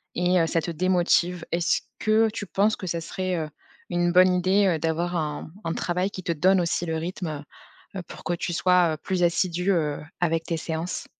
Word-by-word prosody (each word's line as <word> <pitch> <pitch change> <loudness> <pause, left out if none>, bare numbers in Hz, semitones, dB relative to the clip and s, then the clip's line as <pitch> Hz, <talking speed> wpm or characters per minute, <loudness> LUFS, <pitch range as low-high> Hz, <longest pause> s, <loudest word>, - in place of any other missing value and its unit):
et 180 +1 +2
heu, 165 - +2
ça 165 - +1
te 170 - -3
démotive. 175 0 +1
Est-ce 170 0 +1 0.2
que 220 +1 +3
tu 210 -2 -6
penses 210 +4 +2
que 185 - -7
ça 170 0 -1
serait, 185 +2 -3
heu, 155 -1 -3 0.4
une 175 0 +1
bonne 185 +1 +6
idée, 185 +3 +3
heu, 165 -4 +1
d'avoir 165 +2 -1
un 155 -1 -3
un 165 - -2
travail 180 +2 -1
qui 185 -3 -8
te 170 - -1
donne 185 +5 +3
aussi 175 0 0
le 160 0 -1
rythme? 160 -3 -4 0.6
Pour - - -11
que 175 - -1
tu 175 - -3
sois, 180 -2 +3
heu, - - -12
plus 185 +3 -2
assidu, 175 +1 +1
heu, 150 -5 0 0.2
avec 165 -1 +1
tes 165 - -2
séances? 160 +2 -4
175 Hz, 205 wpm, -25 LUFS, 165-185 Hz, 0.6 s, bonne